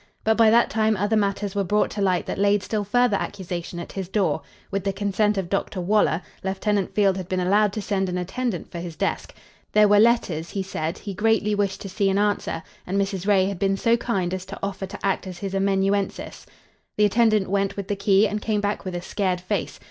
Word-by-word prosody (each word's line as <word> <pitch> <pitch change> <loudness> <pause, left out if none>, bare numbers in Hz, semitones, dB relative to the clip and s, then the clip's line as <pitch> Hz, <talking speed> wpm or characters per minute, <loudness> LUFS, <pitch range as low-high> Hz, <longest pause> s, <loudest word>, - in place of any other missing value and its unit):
But 220 0 +3
by 225 -1 +5
that 235 +2 +4
time 220 -1 +2
other 205 +3 +1
matters 200 -1 0
were 200 -1 0
brought 210 +3 +1
to 205 - -4
light 185 -3 +1
that - - -4
laid 205 0 +3
still 215 -2 -2
further 235 +1 +2
accusation 175 -3 -5
at 170 - -7
his 190 -2 -5
door. 185 -7 +1 0.3
With 195 -1 -1
the 195 - 0
consent 205 +1 0
of 190 -3 -1
Dr. 195 0 -2
Waller, 180 -3 +2 0.2
Lieutenant 195 +1 -1
Field 195 -2 +3
had 185 -2 -6
been 185 - 0
allowed 200 +3 +3
to 215 - -4
send 195 -2 -1
an 180 - -2
attendant 190 +2 -3
for 170 - -5
his 170 -1 -6
desk. - - -2 0.4
There 210 0 +6
were 205 0 +5
letters, 205 -8 +2
he 195 - -3
said, 165 -2 -3
he 200 - -6
greatly 210 +1 +2
wished 200 -2 -1
to - - -6
see 195 +1 +1
and 195 - +1
answer, 205 -5 0 0.2
and 195 +2 0
Mrs. 195 -1 -2
Ray 195 -2 +4
had 195 -2 -3
been 195 +1 +1
so 230 +3 +3
kind 195 -7 -1
as 185 -1 -3
to 195 - -7
offer 195 -1 -3
to 200 +1 -7
act 195 0 0
as 180 -1 -7
his 195 +1 -5
amanuensis. 195 0 -1 0.5
The 210 - +5
attendant 215 -1 +3
went 200 0 0
with 200 -1 -4
the 205 - -1
key 200 +1 +3
and 210 +1 -3
came 215 -1 0
back 205 0 -2
with 185 -2 -5
a 175 - -4
scared 185 -2 -1
face. 180 - -3
200 Hz, 230 wpm, -24 LUFS, 190-210 Hz, 0.5 s, There